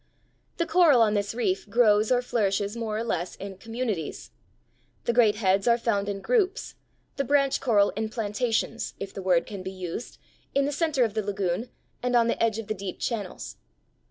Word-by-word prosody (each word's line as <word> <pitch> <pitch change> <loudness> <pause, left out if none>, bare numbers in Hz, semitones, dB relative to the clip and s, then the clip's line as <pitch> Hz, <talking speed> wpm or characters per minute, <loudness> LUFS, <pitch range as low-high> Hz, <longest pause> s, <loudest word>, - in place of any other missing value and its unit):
The 335 - +1
coral 330 -7 +5
on 210 -1 +2
this 205 +1 -1
reef 205 -4 -1
grows 215 -1 +4
or 250 0 +3
flourishes 205 -3 0
more 220 -2 -3
or 225 - -1
less 180 -6 -2
in 195 -1 -8
communities. 225 - -4 0.7
The 235 - 0
great 225 -3 +4
heads 195 0 +1
are 235 0 +5
found 205 -4 0
in 195 -1 -4
groups, 425 - 0 0.4
the 275 - +1
branch 275 0 +2
coral 205 -5 +3
in 220 +1 -3
plantations, 225 +1 -2
if 195 - -6
the 195 - -6
word 180 -2 +2
can 200 -3 -7
be 185 - -5
used, 185 +4 -6 0.4
in 275 0 +3
the 290 - -1
center 295 -3 +1
of 225 -3 0
the 220 - 0
lagoon 200 +1 -2 0.3
and 250 0 0
on 235 -1 +5
the 230 - 0
edge 225 -1 +1
of 225 - -5
the 215 - -2
deep 195 -2 -6
channels. 210 -6 -4
220 Hz, 190 wpm, -26 LUFS, 200-245 Hz, 0.7 s, coral